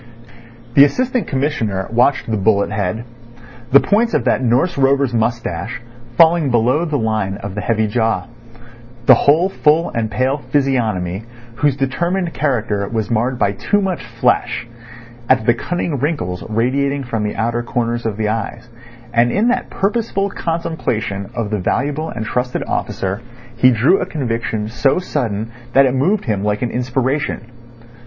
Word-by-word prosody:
The 140 - +8
Assistant 250 - +1
Commissioner 115 -9 -1
watched 125 +4 +2
the 110 - 0
bullet 100 0 +2
head; 105 +1 -2 0.7
the 140 - +8
points 225 +7 +1
of - - +1
that - - +1
Norse 130 +9 +2
rover's 135 -2 +2
moustache, 115 -3 -2 0.4
falling 165 -3 +5
below 125 +7 +2
the 155 -3 -1
line 110 -4 -1
of 100 -1 -6
the 105 - -3
heavy 110 +2 +1
jaw; 110 +1 0 0.8
the 130 - +9
whole 150 +8 +4
full 165 -3 +2
and 115 -1 -2
pale 130 +5 0
physiognomy, 110 -9 0 0.3
whose 145 0 +2
determined 170 +6 -1
character 110 -8 -1
was 110 -1 -2
marred 120 +3 0
by 100 - +2
too 205 - 0
much 185 -9 -2
flesh; 120 0 0 0.6
at 125 -4 +3
the 120 - +5
cunning 165 +2 -3
wrinkles 120 - -2
radiating 135 +5 0
from 115 -4 -3
the 105 - -2
outer 115 +1 -1
corners 120 0 -2
of 110 -3 -2
the 110 -1 0
eyes—and 115 +1 -3
in 220 +5 +2
that 250 +1 -1
purposeful 200 -1 -1
contemplation 120 - -3
of 110 -3 -2
the 105 - 0
valuable 145 - -1
and 110 -6 -5
trusted 125 +3 -2
officer 95 +3 -2 0.3
he 125 +2 +5
drew 130 - +3
a - - 0
conviction 115 - -2
so 120 +6 +1
sudden 115 - -2 0.2
that 135 0 +6
it 130 - +1
moved 180 +11 +1
him 105 -5 -1
like 105 +2 0
an 120 - -1
inspiration. 130 +4 -1
120 Hz, 155 wpm, -18 LUFS, 110-145 Hz, 0.8 s, the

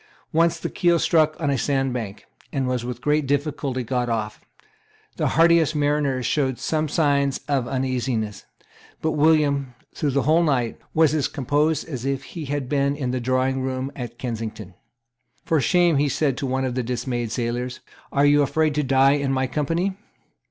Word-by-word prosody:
Once 165 +1 +3
the - - -3
keel 175 -2 +2
struck 155 -2 +2
on 145 -4 0
a 135 - +1
sand 135 -2 0
bank, 110 -5 -5 0.3
and 135 -3 -1
was 125 -2 -1
with 120 0 -5
great 150 -1 +1
difficulty 140 -2 -1
got 125 0 -1
off. 110 -2 -3 0.8
The - - +1
hardiest 165 -2 +5
mariners 145 -3 0
showed 130 -3 0
some 155 -1 -1
signs 140 -3 +1
of 135 -4 0
uneasiness. 125 -5 -2 0.6
But 160 - +1
William, 145 -4 +2 0.2
through 150 - -1
the 140 0 +1
whole 160 +3 +4
night, 130 -8 0 0.2
was 160 -2 +4
as 150 -3 +1
composed 145 +2 0
as 130 -7 -5
if 135 0 -2
he 165 -4 -7
had 140 -1 -3
been 140 +1 +1
in 130 -4 -2
the 130 -1 -2
drawingroom 130 +1 -1
at 120 -2 -7
Kensington. 110 -6 -5 0.7
"For 160 -3 +2
shame," 175 -1 +3
he 145 +1 +2
said 140 0 0
to 135 - -2
one 130 +1 -1
of 130 - -2
the 130 - -1
dismayed 120 -1 -3
sailors 120 +1 -3 0.3
"are 140 0 +3
you 145 0 +5
afraid 155 +2 +1
to 150 +1 0
die 135 0 +4
in 140 -1 0
my 130 0 +1
company?" 165 +8 -1
135 Hz, 175 wpm, -23 LUFS, 125-150 Hz, 0.8 s, hardiest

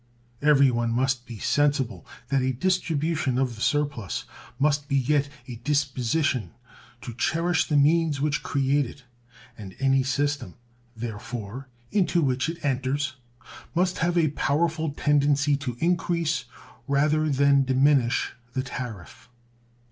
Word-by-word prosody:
Everyone 135 -5 +4
must 130 +1 0
be 115 - -8
sensible 140 0 0 0.2
that 140 -1 +2
a 130 0 0
distribution 155 -3 0
of 130 -3 0
the 110 - -11
surplus 140 -9 -1 0.3
must 145 +1 +1
beget 140 +1 +1 0.2
a 120 -2 -7
disposition 135 -1 0 0.5
to 120 - -7
cherish 165 +7 +1
the 150 - +2
means 155 0 +3
which 150 +1 0
create 140 0 +1
it, 135 - -13 0.6
and 95 -3 -9
any 135 0 +3
system, 140 -5 -1 0.4
therefore, 120 +2 -6 0.2
into 180 -4 +2
which 130 +2 0
it 165 -2 -6
enters 135 0 -1 0.6
must 180 +1 +1
have 175 +1 +1
a 160 -3 +3
powerful 160 +3 0
tendency 145 0 +2
to 125 -4 -5
increase 170 -2 0 0.4
rather 150 +2 +2
than 140 0 +4
diminish 130 -1 +2 0.2
the 130 - -1
tariff. 125 -5 -8
140 Hz, 125 wpm, -25 LUFS, 130-150 Hz, 0.6 s, Everyone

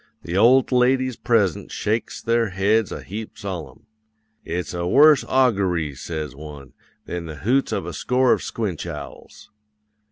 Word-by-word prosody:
The 85 - -5
old 125 +7 +5
ladies 130 0 +2
present 105 -9 0
shakes 110 +2 -2
their 115 -1 +1
heads 100 +3 +1
a - - -6
heap 105 +4 -7
solemn. 90 - -7 0.6
"'"It's 90 +2 -4
a 85 0 -2
worse 150 +7 +6
augoory," 95 - +1
says 75 0 -6
one, 70 -3 -11 0.3
"than 85 -1 -5
the 80 - -7
hoots 135 +3 +2
of 100 -5 -2
a 85 - -6
score 125 +7 +2
of - - -1
squinch 95 -7 -4
owls." 75 -4 -10
100 Hz, 150 wpm, -22 LUFS, 85-120 Hz, 0.6 s, worse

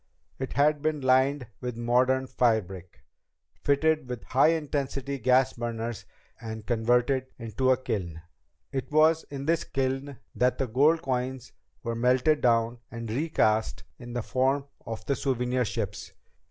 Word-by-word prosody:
It 130 - -4
had 145 +1 +3
been 155 -1 -1
lined 130 +1 +3
with 125 -2 -5
modern 125 +3 +2
firebrick, 100 -8 -1 0.6
fitted 150 -1 +2
with 125 -2 -5
high 135 +3 +3
intensity 140 -3 -1
gas 130 +2 +3
burners 115 -1 -4 0.4
and 110 -1 -7
converted 125 +3 +1
into 115 +2 -1
a 130 - +5
kiln. 90 -10 -4 0.5
It 130 -1 -4
was 155 +1 +4
in 140 -1 -6
this 165 +1 +1
kiln 135 +1 -2 0.2
that 125 0 +1
the 135 - 0
gold 150 +8 +3
coins 130 -1 -3 0.3
were 115 - -2
melted 125 +6 +2
down 115 0 +2
and 115 -1 -6
recast 115 -5 +1 0.2
in 120 -1 -9
the 120 -2 -2
form 135 +3 +1 0.2
of 110 -1 -6
the 140 - +1
souvenir 125 -2 0
ships. - - -4
130 Hz, 140 wpm, -27 LUFS, 115-140 Hz, 0.6 s, a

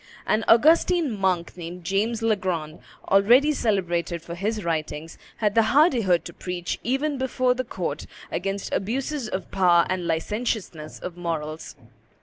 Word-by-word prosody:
An 215 +1 +1
Augustine 315 +2 +4
monk, 185 -4 0
named 175 0 -8
James 215 +6 -1
Legrand, 180 -8 -1 0.3
already 240 +10 +5
celebrated 175 - -1
for 170 - -7
his 210 +4 -2
writings, 160 -1 -3 0.2
had 210 -2 +1
the 225 - +5
hardihood 230 - +3
to - - -8
preach 180 -1 -4
even 270 +3 -1
before 255 -1 +1
the 255 +1 -3
court 250 - -4 0.2
against 195 0 -3
abuses 255 +4 -2
of 190 - -5
power 175 -3 +4
and 180 -2 -2
licentiousness 170 -2 -3
of 180 -1 -7
morals. 160 -2 -4
195 Hz, 135 wpm, -24 LUFS, 170-235 Hz, 0.3 s, already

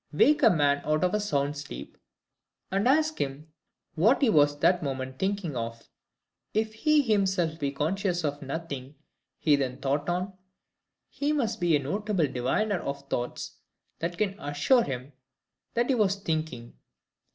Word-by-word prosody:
Wake 285 - +4
a - - +7
man 145 -4 +2
out 155 +1 +1
of 180 - +2
a 210 - +2
sound 145 -8 0
sleep, 70 - -8 0.8
and 195 +4 +1
ask 310 +3 +2
him 145 +3 -4 0.4
what 215 - +4
he 235 - +5
was 145 -4 +4
that 175 +4 +3
moment 130 -2 -4
thinking 190 -6 -1
of. 115 -1 -5 0.7
If 220 0 0
he 300 +6 +3
himself 190 - +1
be 140 -2 -1
conscious 175 +5 -1
of 145 -1 -2
nothing 140 -1 -5 0.4
he 150 -2 +4
then 130 -2 -2
thought 140 +3 -1
on, 180 +3 -1 0.7
he 290 +1 -2
must 230 -7 -1
be 170 -3 +4
a 145 - 0
notable 200 +3 0
diviner 145 - 0
of 140 0 -5
thoughts 120 0 -3 0.4
that 170 +1 -3
can 205 -2 -1
assure 145 - +3
him 135 - -5 0.6
that 240 +2 +1
he - - +4
was 205 -5 +2
thinking. 155 - -4
160 Hz, 155 wpm, -28 LUFS, 140-205 Hz, 0.8 s, a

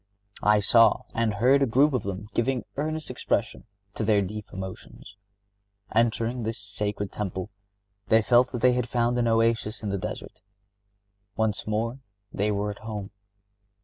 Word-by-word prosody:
I 105 0 +4
saw 115 +1 +5
and 115 -2 0
heard 130 +7 +4
a 135 - +3
group 135 +6 +4
of 125 - +1
them 100 +1 -5
giving 125 +1 0
earnest 155 0 -3
expression 120 -2 -2 0.3
to 110 - -3
their 105 -2 +3
deep 105 +2 -6
emotions. 95 +1 -9 0.8
Entering 115 +1 +1
this 115 +1 -3
sacred 100 0 -4
temple, 95 -1 -4 0.6
they 110 +1 +4
felt 125 +2 +4
that 120 -3 -4
they 125 0 +5
had 125 -1 -1
found 120 0 +1
an 120 - +2
oasis 115 -1 +1
in 105 - -2
the 100 0 -1
desert. 105 +3 -7 0.9
Once 110 -1 -1
more 115 +4 -1 0.3
they 105 +2 0
were 105 0 -1
at 100 - -10
home. 105 -2 -6
110 Hz, 155 wpm, -26 LUFS, 105-120 Hz, 0.9 s, saw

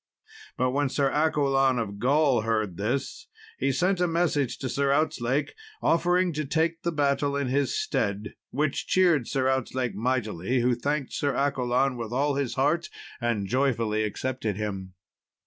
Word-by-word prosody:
But 130 0 +1
when 140 +1 +1
Sir 135 0 +1
Accolon 135 -4 +2
of 100 -3 -3
Gaul 135 0 +3
heard 110 -4 -1
this, 120 +7 -3 0.3
he 135 - +1
sent 180 +7 +1
a 180 - +2
message 160 -7 0
to 130 - -4
Sir 140 +2 0
Outzlake 145 -2 0 0.3
offering 175 +1 +2
to 155 +1 -2
take 165 +3 0
the 170 - -1
battle 140 -2 +1
in 140 -2 -1
his 140 - +1
stead, 105 - -2 0.2
which 145 0 -1
cheered 170 -9 +3
Sir 130 -2 0
Outzlake 130 -3 -1
mightily, 120 0 -1
who 125 +1 +3
thanked 140 +3 -2
Sir 145 -1 0
Accolon 130 -1 +1
with 115 -2 -5
all 140 +3 +1
his 140 -3 -2
heart, 150 +5 +1 0.3
and 115 -4 0
joyfully 115 -3 +1
accepted 110 0 -2
him. 95 -3 -5
135 Hz, 155 wpm, -26 LUFS, 120-145 Hz, 0.3 s, Gaul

